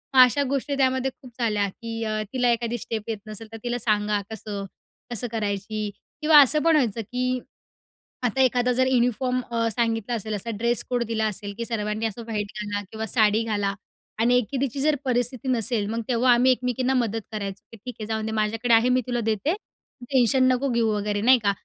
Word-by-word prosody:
मग 260 Hz, -, +7 dB
अशा 265 Hz, +3 st, +3 dB
गोष्टी 280 Hz, +1 st, -1 dB
त्यामध्ये 260 Hz, 0 st, +1 dB
खूप 255 Hz, -2 st, -12 dB
झाल्या 210 Hz, -3 st, +1 dB
की 225 Hz, +2 st, -6 dB
अ, 215 Hz, -1 st, -1 dB
तिला 250 Hz, -2 st, +2 dB
एखादी 235 Hz, 0 st, -1 dB
स्टेप 225 Hz, -2 st, -4 dB
येत 220 Hz, -, -1 dB
नसेल 215 Hz, +1 st, -8 dB
तर 225 Hz, -, -7 dB
तिला 240 Hz, 0 st, -1 dB
सांगा 210 Hz, -2 st, +1 dB
कसं, 205 Hz, -2 st, -5 dB, 0.5 s
कसं 240 Hz, +1 st, -2 dB
करायची. 210 Hz, -1 st, -2 dB, 0.3 s
किंवा 305 Hz, -1 st, +8 dB
असं 300 Hz, +3 st, +4 dB
पण 330 Hz, -1 st, +4 dB
व्हायचं 235 Hz, -6 st, +1 dB
की 250 Hz, +3 st, -2 dB, 0.9 s
आता 245 Hz, +3 st, +1 dB
एखादा 250 Hz, -1 st, +3 dB
जर 260 Hz, +1 st, +2 dB
युनिफॉर्म 250 Hz, 0 st, +1 dB
अ, 230 Hz, -1 st, +1 dB
सांगितला 225 Hz, +1 st, -1 dB
असेल, 215 Hz, -1 st, -4 dB
असा 205 Hz, +3 st, -5 dB
ड्रेस-कोड 240 Hz, +1 st, 0 dB
दिला 220 Hz, -1 st, 0 dB
असेल 205 Hz, -1 st, -5 dB
की 230 Hz, -, -3 dB
सर्वांनी 215 Hz, -1 st, -2 dB
असं 225 Hz, +1 st, -3 dB
व्हाईट 210 Hz, -2 st, -2 dB
घाला 205 Hz, 0 st, -3 dB
किंवा 220 Hz, 0 st, -4 dB
साडी 220 Hz, -1 st, +3 dB
घाला 205 Hz, -3 st, -1 dB, 0.5 s
आणि 245 Hz, +2 st, +4 dB
एखादीची 265 Hz, +3 st, -1 dB
जर 305 Hz, 0 st, +3 dB
परिस्थिती 245 Hz, 0 st, -1 dB
नसेल, 230 Hz, -3 st, +1 dB
मग 230 Hz, +1 st, -2 dB
तेव्हा 245 Hz, 0 st, +3 dB
आम्ही 250 Hz, +2 st, +5 dB
एकमेकींना 255 Hz, +1 st, 0 dB
मदत 225 Hz, -3 st, 0 dB
करायचो 200 Hz, -2 st, -5 dB
की, 230 Hz, -, -11 dB
"ठीक 230 Hz, +3 st, -8 dB
आहे 215 Hz, -, -4 dB
जाऊन 220 Hz, -1 st, -2 dB
दे 220 Hz, -, -3 dB
माझ्याकडे 225 Hz, +2 st, +1 dB
आहे, 225 Hz, +2 st, +5 dB
मी 255 Hz, 0 st, +3 dB
तुला 245 Hz, -1 st, -1 dB
देते. 220 Hz, -, 0 dB
तू 380 Hz, -, -14 dB
टेन्शन 260 Hz, 0 st, +4 dB
नको 270 Hz, +2 st, 0 dB
घेऊ 235 Hz, -1 st, +2 dB
वगैरे." 205 Hz, 0 st, -1 dB
नाही 255 Hz, +2 st, +6 dB
का? 200 Hz, -, +3 dB
230 Hz, 195 wpm, -25 LUFS, 215-250 Hz, 0.9 s, किंवा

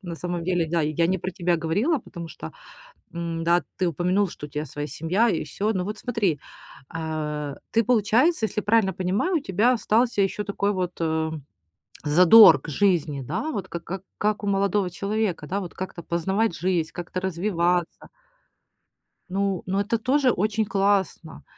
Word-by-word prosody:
На 175 Hz, -4 st, -6 dB
самом 175 Hz, 0 st, -4 dB
деле, 175 Hz, -2 st, +1 dB
да, 165 Hz, +1 st, 0 dB
я 155 Hz, +2 st, +1 dB
не 190 Hz, +1 st, 0 dB
про 185 Hz, -, -4 dB
тебя 175 Hz, -2 st, 0 dB
говорила, 205 Hz, -, +1 dB
потому 170 Hz, -6 st, -9 dB
что, -, -, -9 dB, 0.6 s
м, 170 Hz, -1 st, -4 dB
да, 170 Hz, 0 st, +3 dB
ты 185 Hz, -, 0 dB
упомянул, 180 Hz, +4 st, +1 dB
что 150 Hz, -, -8 dB
у 150 Hz, -, -12 dB
тебя 150 Hz, +1 st, -4 dB
своя 145 Hz, +1 st, -5 dB
семья 165 Hz, -, +1 dB
и 170 Hz, -, -1 dB
всё. 205 Hz, +9 st, -2 dB
Ну 185 Hz, -, -1 dB
вот 210 Hz, +3 st, -5 dB
смотри, 210 Hz, -, -1 dB, 0.6 s
э, 150 Hz, -3 st, -3 dB, 0.2 s
ты 230 Hz, -, +3 dB
получается, 235 Hz, -, +3 dB
если 215 Hz, 0 st, -2 dB
я -, -, -19 dB
правильно 210 Hz, -3 st, +3 dB
понимаю, 195 Hz, -, 0 dB
у -, -, +3 dB
тебя 220 Hz, +4 st, +2 dB
остался 230 Hz, 0 st, +1 dB
еще 195 Hz, +2 st, -1 dB
такой 200 Hz, 0 st, -1 dB
вот, 180 Hz, -3 st, -2 dB
э, 160 Hz, -1 st, 0 dB, 0.7 s
задор 180 Hz, +8 st, +8 dB
к -, -, -10 dB
жизни, 160 Hz, -4 st, +1 dB
да. 165 Hz, -, -3 dB
Вот 190 Hz, -6 st, -4 dB
к 170 Hz, -, -5 dB
как 185 Hz, +2 st, -6 dB
как 210 Hz, 0 st, -1 dB
у -, -, -2 dB
молодого 200 Hz, -1 st, +1 dB
человека, 200 Hz, -2 st, -2 dB
да, 195 Hz, +6 st, -2 dB
вот 180 Hz, -, -8 dB
как-то 180 Hz, -2 st, -6 dB
познавать 190 Hz, +5 st, 0 dB
жизнь, 170 Hz, -2 st, -1 dB
как-то 175 Hz, +1 st, -5 dB
развиваться. 175 Hz, -2 st, -1 dB, 1.2 s
Ну, 195 Hz, -1 st, -1 dB
но 190 Hz, +2 st, -1 dB
это 230 Hz, +3 st, 0 dB
тоже 260 Hz, +2 st, +2 dB
очень 215 Hz, +2 st, 0 dB
классно. 195 Hz, -7 st, -1 dB
185 Hz, 175 wpm, -24 LUFS, 165-205 Hz, 1.2 s, задор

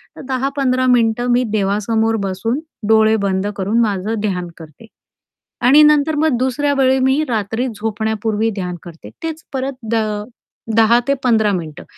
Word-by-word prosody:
तर -, -, -10 dB
10-15 265 Hz, -1 st, 0 dB
मिनिटं 240 Hz, -1 st, +2 dB
मी 245 Hz, +1 st, +3 dB
देवासमोर 215 Hz, +2 st, 0 dB
बसून, 200 Hz, +7 st, -2 dB, 0.3 s
डोळे 220 Hz, 0 st, +4 dB
बंद 190 Hz, 0 st, 0 dB
करून, 205 Hz, +4 st, 0 dB
माझं 210 Hz, 0 st, -1 dB
ध्यान 185 Hz, -4 st, -2 dB
करते. 160 Hz, +5 st, -13 dB, 0.8 s
आणि 270 Hz, +5 st, +6 dB
नंतर 300 Hz, +1 st, +3 dB
मग 305 Hz, -4 st, +2 dB
दुसऱ्या 270 Hz, +3 st, 0 dB
वेळी 265 Hz, 0 st, +3 dB
मी 265 Hz, +3 st, +2 dB
रात्री 225 Hz, +2 st, -1 dB
झोपण्यापूर्वी 220 Hz, 0 st, -1 dB
ध्यान 180 Hz, -3 st, -4 dB
करते. 165 Hz, -, -11 dB
तेच 320 Hz, -1 st, -5 dB
परत 270 Hz, +1 st, -2 dB, 0.2 s
द -, -, +2 dB
अ, 215 Hz, -2 st, -1 dB, 0.5 s
10 225 Hz, +1 st, +5 dB
ते 280 Hz, -, +3 dB
15 220 Hz, -4 st, +3 dB
मिनिटं, 160 Hz, -4 st, -5 dB
225 Hz, 150 wpm, -18 LUFS, 205-260 Hz, 0.8 s, आणि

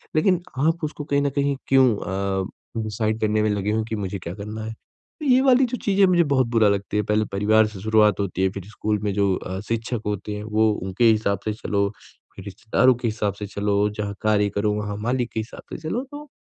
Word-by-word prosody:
लेकिन 180 Hz, +3 st, +3 dB, 0.3 s
आप 165 Hz, +1 st, 0 dB
उसको 150 Hz, -1 st, -4 dB
कहीं 145 Hz, -1 st, +1 dB
न 140 Hz, -, +1 dB
कहीं 140 Hz, 0 st, +2 dB
क्यों 135 Hz, -1 st, +5 dB
अ, 95 Hz, +3 st, -4 dB
डिसाइड 110 Hz, +1 st, -1 dB
करने 110 Hz, 0 st, +2 dB
में 110 Hz, -, +2 dB
लगे 105 Hz, 0 st, -1 dB
हो 110 Hz, +1 st, 0 dB
कि 110 Hz, -, -2 dB
मुझे 100 Hz, -2 st, -4 dB
क्या 85 Hz, 0 st, -6 dB
करना 105 Hz, +2 st, -6 dB
है। 110 Hz, -, -5 dB, 0.5 s
तो -, -, -4 dB
ये 260 Hz, -1 st, +5 dB
वाली 265 Hz, -1 st, +5 dB
जो 250 Hz, 0 st, -3 dB
चीज़ें 200 Hz, -1 st, +4 dB
मुझे 175 Hz, -2 st, +4 dB
बहुत 135 Hz, -5 st, +2 dB
बुरा 110 Hz, -2 st, +5 dB
लगती 100 Hz, +1 st, -1 dB
है 105 Hz, -, +2 dB
पहले 105 Hz, +1 st, +2 dB
परिवार 110 Hz, +2 st, +3 dB
से 105 Hz, -2 st, -9 dB
शुरुआत 110 Hz, 0 st, +3 dB
होती 95 Hz, -2 st, -2 dB
है, 95 Hz, -, +3 dB
फिर 100 Hz, -1 st, -7 dB
स्कूल 105 Hz, -1 st, -2 dB
में 105 Hz, -1 st, 0 dB
जो 100 Hz, -1 st, +2 dB
अ, 95 Hz, +1 st, -5 dB
शिक्षक 115 Hz, 0 st, -2 dB
होते 105 Hz, 0 st, -3 dB
हैं 105 Hz, -, -6 dB
वो 110 Hz, 0 st, +2 dB
उनके 95 Hz, +4 st, -1 dB
हिसाब 105 Hz, -3 st, 0 dB
से 110 Hz, -, 0 dB
चलो, 100 Hz, -2 st, -1 dB, 0.5 s
फिर 95 Hz, -, -10 dB
रिश्तेदारों 115 Hz, +6 st, +2 dB
के 120 Hz, 0 st, -3 dB
हिसाब 105 Hz, -2 st, -1 dB
से 105 Hz, -, -4 dB
चलो, 100 Hz, +1 st, 0 dB
जहाँ 105 Hz, -1 st, -4 dB
कार्य 105 Hz, -1 st, +2 dB
करो 105 Hz, +1 st, +1 dB
वहाँ 105 Hz, 0 st, -3 dB
मालिक 125 Hz, -1 st, 0 dB
के -, -, -1 dB
हिसाब 110 Hz, +3 st, -7 dB
से -, -, -4 dB
चलो 245 Hz, +8 st, -1 dB
तो 295 Hz, +1 st, -9 dB
110 Hz, 230 wpm, -23 LUFS, 100-120 Hz, 0.5 s, क्यों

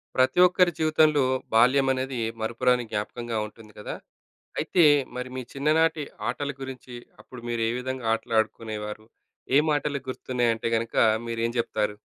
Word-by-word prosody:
ప్రతి 130 Hz, +5 st, +3 dB
ఒక్కరి 180 Hz, 0 st, +3 dB
జీవితంలో, 155 Hz, -2 st, +4 dB, 0.3 s
బాల్యం 130 Hz, +4 st, +5 dB
అనేది 130 Hz, -1 st, -3 dB, 0.2 s
మరుపురాని 125 Hz, +2 st, +1 dB
జ్ఞాపకంగా 115 Hz, +2 st, -3 dB
ఉంటుంది 110 Hz, 0 st, -16 dB
కదా! 105 Hz, -, -5 dB, 0.6 s
అయితే, 175 Hz, -, +3 dB, 0.3 s
మరి 125 Hz, 0 st, -4 dB
మీ 130 Hz, -, -3 dB
చిన్ననాటి 155 Hz, +2 st, +2 dB, 0.3 s
ఆటల 145 Hz, -1 st, -3 dB
గురించి, 130 Hz, -2 st, -8 dB, 0.3 s
అప్పుడు 125 Hz, -2 st, -12 dB
మీరు 115 Hz, -1 st, -1 dB
ఏ -, -, 0 dB
విధంగా 130 Hz, -1 st, -5 dB
ఆటలు 115 Hz, +1 st, -3 dB
ఆడుకునేవారు? 110 Hz, -1 st, -4 dB, 0.5 s
ఏం 150 Hz, -, +5 dB
మాటలు 145 Hz, -1 st, 0 dB
గుర్తున్నాయి 125 Hz, -2 st, 0 dB
అంటే 110 Hz, -, -4 dB
గనక 115 Hz, +1 st, -3 dB, 0.3 s
మీరు 115 Hz, 0 st, -3 dB
ఏం 115 Hz, -, -1 dB
జెప్తారు? 105 Hz, -3 st, -1 dB
125 Hz, 145 wpm, -26 LUFS, 115-140 Hz, 0.6 s, బాల్యం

